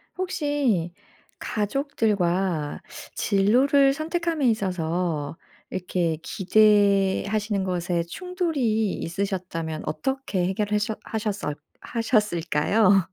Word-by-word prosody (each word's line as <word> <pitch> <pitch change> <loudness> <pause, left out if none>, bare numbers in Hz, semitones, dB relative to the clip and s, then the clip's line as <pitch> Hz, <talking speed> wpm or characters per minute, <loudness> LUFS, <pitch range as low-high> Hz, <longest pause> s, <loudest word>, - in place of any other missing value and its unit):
혹시 290 - 0 0.5
가족들과 195 - -1 0.3
진로를 260 +8 +4
선택함에 325 -1 -1
있어서 170 -6 -1 0.3
이렇게 175 -3 -1
기대하시는 205 +1 +2
것에 175 -2 -1
충돌이 265 - -1
있으셨다면 175 -3 -3
어떻게 265 - -2
해결하셨 210 +3 -1
하셨었 210 -9 -3 0.2
하셨을까요? 200 -3 +2
205 Hz, 225 characters per minute, -25 LUFS, 180-235 Hz, 0.5 s, 진로를